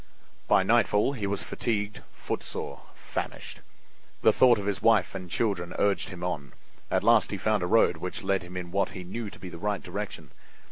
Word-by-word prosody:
By - - +5
nightfall 105 +7 +3
he 105 -7 -3
was 100 0 -1
fatigued, 105 -3 -2
footsore, - - -5
famished. - - -5 0.6
The - - +6
thought 125 -2 +6
of 100 - -4
his 100 -1 -1
wife 110 -6 +4
and 90 -2 -6
children 85 -2 -1
urged 100 -1 +1
him 90 -2 -8
on. 75 -7 -3 0.4
At - - +1
last 115 0 +5
he 100 - -3
found 105 +1 +1
a 90 - 0
road 100 -4 +4
which 90 +2 -5
led 95 -1 +1
him 90 +1 -8
in 90 -1 -5
what 100 +2 0
he 90 - -6
knew 105 +5 -5
to - - -13
be 90 - -8
the 85 - -9
right 105 0 -1
direction. - - -6
100 Hz, 195 wpm, -28 LUFS, 90-105 Hz, 0.6 s, The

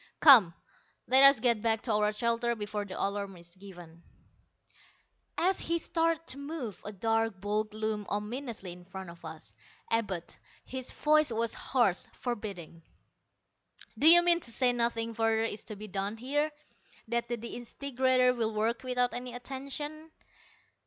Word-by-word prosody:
"Come, 225 - +8 0.5
let 265 +1 +5
us 275 -3 +8
get 235 -2 +2
back 225 -1 +1
to 235 - -1
our 210 0 +2
shelter 235 +2 0
before 210 -1 -4
the 190 - -7
alarm 200 -1 -3
is 170 0 -13
given." 175 -4 -13 1.4
As 370 +2 +1
he 335 +1 -1
started 330 0 -1
to 275 - -3
move, 280 - -6
a 205 - -6
dark 225 0 -1
bulk 210 +2 -2
loomed 215 -1 -3
ominously 215 -1 -4
in 180 0 -11
front 190 -1 -9
of 170 - -17
us 160 -1 -9 0.4
Abud. 200 -7 -2 0.3
His 260 -1 -5
voice 305 -2 +3
was 230 0 0
harsh, 235 -9 +1
forbidding. 200 -9 -6 1.1
"Do 275 +8 +3
you 345 +1 +9
mean 345 -1 +4
to 245 - 0
say 245 +1 +2
nothing 230 -1 -1
further 225 0 +1
is 225 -2 -4
to 215 - -7
be 210 +1 -9
done 200 +2 -3
here 290 +6 -1 0.6
that 235 0 -1
the 240 - -2
disintegrator 255 +2 0
will 225 -3 -2
work 225 +3 0
without 250 -1 0
any 245 0 -5
attention?" 280 +5 -6
230 Hz, 150 wpm, -30 LUFS, 205-260 Hz, 1.4 s, you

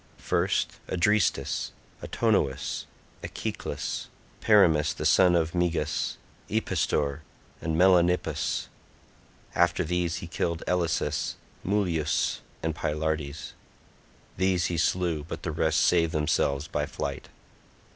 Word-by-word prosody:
First - - 0
Adrestus, 105 +2 +1 0.3
Autonous, 100 - 0 0.3
Echeclus, - - -4 0.3
Perimus 85 -9 +4
the - - -4
son 90 -2 +5
of 80 -1 +1
Megas, 85 -4 0 0.3
Epistor 75 -9 0 0.4
and 80 -1 -1
Melanippus; 90 0 +3 0.9
after 85 0 +2
these 90 0 -1
he - - -5
killed 85 -1 -2
Elasus, 85 -3 0 0.3
Mulius, 90 -6 0 0.2
and 80 0 0
Pylartes. 75 -1 -3 0.8
These 95 -1 +2
he 85 0 -1
slew, 85 -2 +1
but 80 - -7
the 85 - -2
rest 80 0 +1
saved 85 -1 +3
themselves 75 -2 +1
by - - -2
flight. - - -5
85 Hz, 100 wpm, -27 LUFS, 80-90 Hz, 0.9 s, son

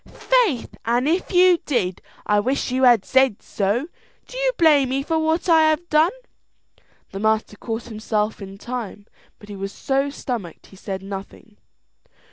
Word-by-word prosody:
"Faith, 455 - 0
an' 240 +3 +1
if 340 +5 0
you 360 -1 +5
did, 195 -10 -1 0.2
I 210 0 +2
wish 260 +4 -1
you 260 +1 0
had 235 -6 +5
said 265 -5 +2
so. 210 +7 -1 0.4
Do - - -13
you - - +1
blame 295 -6 +4
me 270 +1 -1
for 320 +2 0
what 320 +2 0
I 320 -2 +5
have 315 +3 -1
done?" 310 +2 +4 1.0
The 195 - -6
master 220 0 0
caught 225 +2 -5
himself 215 -1 -3
in 195 0 -9
time, 220 -2 -6 0.3
but 205 - -15
he 205 - -8
was 195 0 -5
so 275 +4 -1
stomached, 240 - -6
he - - -17
said 190 0 -6
nothing. 200 +2 -9
245 Hz, 165 wpm, -22 LUFS, 205-310 Hz, 1.0 s, you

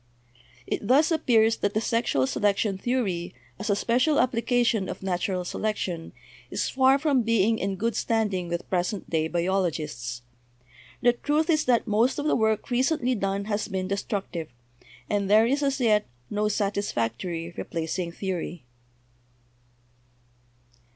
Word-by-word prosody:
It 205 - -3
thus 295 +7 +4
appears 225 -8 +3
that 205 0 -1
the - - +3
sexual 230 - +1
selection 200 +6 +1
theory, 190 -6 -2 0.2
as 210 +2 -4
a 205 - +3
special 250 +8 +2
application, 240 -4 +1
of - - -6
natural 180 0 -1
selection, 180 -5 -3 0.4
is - - -1
far 265 +1 +4
from 280 -3 +2
being 225 -1 +2
in 195 0 -1
good 230 +4 -1
standing 210 -6 0
with 170 0 -3
present 185 +2 -2
day 160 -1 +1
biologists. 160 -9 -2 0.8
The 240 0 +5
truth 300 +6 +1
is 310 -1 +2
that 245 -2 +3
most 225 +4 +2
of 290 - -2
the 305 - +3
work 220 +2 0
recently 255 +1 +1
done 200 -2 -1
has 210 0 -2
been 190 -2 -3
destruc 200 +1 -2
tive, 165 -3 -4 0.6
and 200 -2 0
there 215 +2 +6
is, 275 +5 +1
as 275 -1 0
yet, 215 -4 +3 0.2
no 210 0 +1
satisfactory 175 - -2
replacing 170 +1 -3
theory. 175 -3 -4
210 Hz, 140 wpm, -26 LUFS, 180-240 Hz, 0.8 s, there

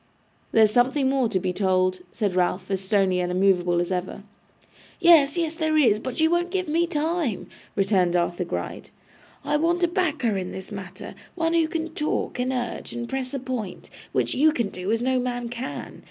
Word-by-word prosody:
'There's 220 -2 +5
something 260 +4 +2
more 265 -3 +2
to 185 - 0
be 180 0 -2
told,' 185 -1 +1
said 205 -5 -1
Ralph, 185 +1 0
as 190 -1 0
stony 190 -2 +2
and 180 0 -1
immovable 180 -2 +2
as 175 +1 -1
ever. 185 +2 -3 0.8
'Yes, 330 -3 +6
yes, 330 -2 0
there 315 -1 0
is, 230 -8 +4
but 255 +4 -5
you 320 - +5
won't 345 +1 +1
give 370 -1 -2
me 335 +3 +1
time,' 315 - -1 0.3
returned 190 -3 +2
Arthur 175 +1 0
Gride. 170 - -5 0.6
'I 295 - +2
want 340 +3 +1
a - - +5
backer 310 - 0
in 185 -1 -4
this 190 +3 -8
matter; 190 -2 -8 0.2
one 330 -1 0
who 330 -1 +3
can 325 0 -3
talk, 300 -4 -2
and 250 +1 0
urge, 245 -2 -4
and 240 0 -4
press 265 -1 -3
a - - -2
point, 245 -7 -5 0.2
which - - 0
you 310 +4 +4
can 235 -9 -1
do 185 +2 -4
as 230 +1 +1
no 260 0 +2
man 245 -1 -3
can. 245 +2 -6
245 Hz, 195 wpm, -24 LUFS, 190-310 Hz, 0.8 s, Yes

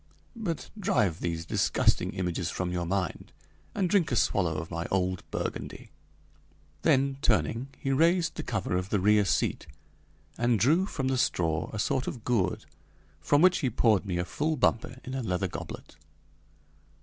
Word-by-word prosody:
But 205 -9 -4
drive 110 - +1
these 85 -1 -3
disgusting - - +1
images 90 -2 -2
from 90 0 -3
your 90 -1 -2
mind, 95 +1 -2 0.4
and 195 -3 +1
drink 175 -6 +2
a - - +1
swallow 90 -7 +1
of 80 +2 -6
my 85 0 -3
old 95 -1 0
Burgundy." - - -5 0.9
Then 135 0 +2
turning, 110 - +1
he 135 - -2
raised 165 +4 +3
the - - -5
cover 100 -5 -2
of 90 +1 -2
the 105 - +1
rear 105 +2 +4
seat, 80 - 0 0.7
and 120 -2 +2
drew 160 - +3
from 135 -9 -3
the 130 -1 +1
straw 80 - 0
a 110 - -5
sort 125 +5 0
of 120 - -5
gourd 115 -7 0 0.5
from 145 - +3
which 185 -1 +5
he 135 - 0
poured 110 -3 +2
me 90 -2 -1
a 90 - -1
full 150 - -1
bumper 125 0 +1
in 130 - -7
a 135 - -2
leather 95 -3 -1
goblet. - - -8
110 Hz, 165 wpm, -28 LUFS, 90-135 Hz, 0.9 s, which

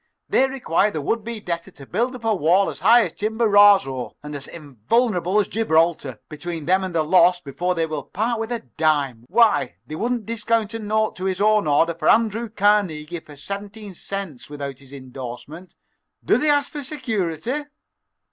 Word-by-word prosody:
They 265 - +3
require 215 -7 +1
the 160 - -4
would 220 +10 -1
be 230 0 -5
debtor 170 -2 -4
to 145 -7 -14
build 240 - -1
up 235 -2 -10
a 225 - +3
wall 185 +2 +2
as - - -11
high 235 +1 +6
as 170 - -6
Chimborazo 205 - +3
and 150 0 -7
as 140 - -8
invulnerable 175 - 0
as 205 - +1
Gibraltar 160 - +1
between 160 +1 -6
them 185 +2 +2
and 185 -2 -5
the 160 - +2
loss 180 +2 +4
before 180 +4 -3
they 165 -1 0
will 155 -2 -4
part 225 +3 -2
with 225 +1 -4
a 235 -2 -2 0.2
dime. 145 -7 +1
Why, 210 - +3
they 150 - -9
wouldn't 235 +6 -2
discount 230 -1 -1
a 225 - -4
note 215 0 0
to 185 - -4
his 190 -1 -1
own 210 -4 +3
order 160 +3 +3
for 165 - 0
Andrew 225 +1 +2
Carnegie 190 -6 +1
for 150 -2 -15
seventeen 200 +6 -7
cents 185 -8 -6
without 140 -2 -6
his 135 -1 -17
indorsement. 135 +5 -9 0.5
Do - - +3
they 305 - +2
ask 290 -1 +2
security!" 250 - -3
185 Hz, 180 wpm, -22 LUFS, 155-220 Hz, 0.5 s, high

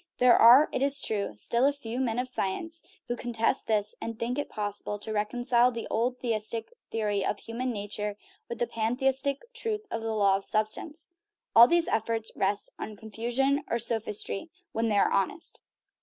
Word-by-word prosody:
There 250 -1 +6
are, 250 +6 +8
it - - -2
is 280 +1 +2
true, 200 - -2
still 235 - +2
a - - +4
few 250 -4 -6
men 240 -3 0
of 250 +1 -1
science 320 - -3 0.3
who 240 - -1
contest 235 +1 -1
this, 210 -1 +1
and 230 -1 -5
think 245 +5 -2
it 290 - -3
possible 205 0 -4
to 215 +1 -5
reconcile 240 +3 +2
the 230 -1 -5
old 245 +3 0
theistic 230 - -2 0.2
theory 210 -3 -1
of 205 - -1
human 245 +4 -4
nature 205 -1 -3 0.3
with 235 - -4
the 240 - +1
pantheistic 265 +5 0
truth 445 -2 -3
of 225 - -2
the 225 0 -2
law 200 -2 +4
of 195 - -8
sub 215 +1 +2
stance. 310 +9 -3 0.4
All 235 +1 +10
these 340 +2 +2
efforts 225 0 -1
rest 200 +1 0
on 215 - -6
confusion 240 +7 0
or 235 - +1
sophistry 225 +2 -1 0.2
when 225 0 0
they 205 - +2
are - - +3
honest. 195 - -1
230 Hz, 185 wpm, -28 LUFS, 215-255 Hz, 0.4 s, All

